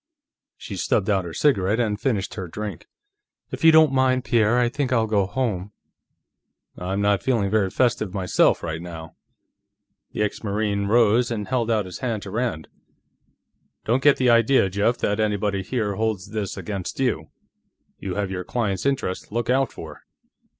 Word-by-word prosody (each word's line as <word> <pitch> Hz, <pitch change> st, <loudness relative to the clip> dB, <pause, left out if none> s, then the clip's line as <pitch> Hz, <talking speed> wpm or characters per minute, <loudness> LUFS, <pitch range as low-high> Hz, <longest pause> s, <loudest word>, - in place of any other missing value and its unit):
She -, -, -7 dB
stubbed 105 Hz, 0 st, +1 dB
out 95 Hz, -3 st, +1 dB
her 85 Hz, -, -6 dB
cigarette 105 Hz, -7 st, +2 dB
and 105 Hz, -3 st, -1 dB
finished 105 Hz, -8 st, -1 dB
her 95 Hz, -4 st, -5 dB
drink. 105 Hz, +3 st, -6 dB, 0.6 s
"If -, -, -6 dB
you 160 Hz, -, +8 dB
don't 155 Hz, -3 st, +6 dB
mind, 130 Hz, -1 st, +2 dB
Pierre, 115 Hz, -1 st, +2 dB
I 125 Hz, -1 st, +3 dB
think 130 Hz, +1 st, -2 dB
I'll 115 Hz, -3 st, +3 dB
go 105 Hz, -3 st, +1 dB
home." 105 Hz, -5 st, -3 dB, 1.0 s
"I'm 95 Hz, +3 st, -3 dB
not 100 Hz, -1 st, +2 dB
feeling 115 Hz, -7 st, 0 dB
very 105 Hz, -3 st, +2 dB
festive, 110 Hz, -4 st, 0 dB
myself, 95 Hz, -2 st, +2 dB
right 80 Hz, -1 st, -4 dB
now." 80 Hz, -2 st, -9 dB, 1.0 s
The -, -, 0 dB
ex 105 Hz, -, -3 dB
Marine 100 Hz, -1 st, -1 dB
rose 115 Hz, +2 st, +3 dB
and 105 Hz, -3 st, -3 dB
held 120 Hz, -3 st, 0 dB
out 110 Hz, -3 st, +1 dB
his 90 Hz, -, -8 dB
hand 115 Hz, -5 st, -3 dB
to 100 Hz, -, -8 dB
Rand. 110 Hz, -8 st, -2 dB, 1.2 s
"Don't 120 Hz, +4 st, +1 dB
get 145 Hz, +1 st, +5 dB
the 125 Hz, -2 st, +3 dB
idea, 115 Hz, -3 st, +4 dB
Jeff, 105 Hz, +5 st, +1 dB
that 105 Hz, -3 st, -1 dB
anybody 105 Hz, -2 st, 0 dB
here 105 Hz, 0 st, -2 dB
holds 105 Hz, -2 st, -2 dB
this 105 Hz, -3 st, -4 dB
against 100 Hz, 0 st, -5 dB
you. 100 Hz, -13 st, -1 dB, 0.7 s
You 95 Hz, -2 st, -4 dB
have 100 Hz, -2 st, -2 dB
your 90 Hz, -1 st, -4 dB
clients' 105 Hz, 0 st, -2 dB
interests 135 Hz, -9 st, -2 dB
to -, -, -17 dB
look 120 Hz, +1 st, 0 dB
out 135 Hz, 0 st, +2 dB
for." -, -, -10 dB
105 Hz, 170 wpm, -23 LUFS, 95-120 Hz, 1.2 s, you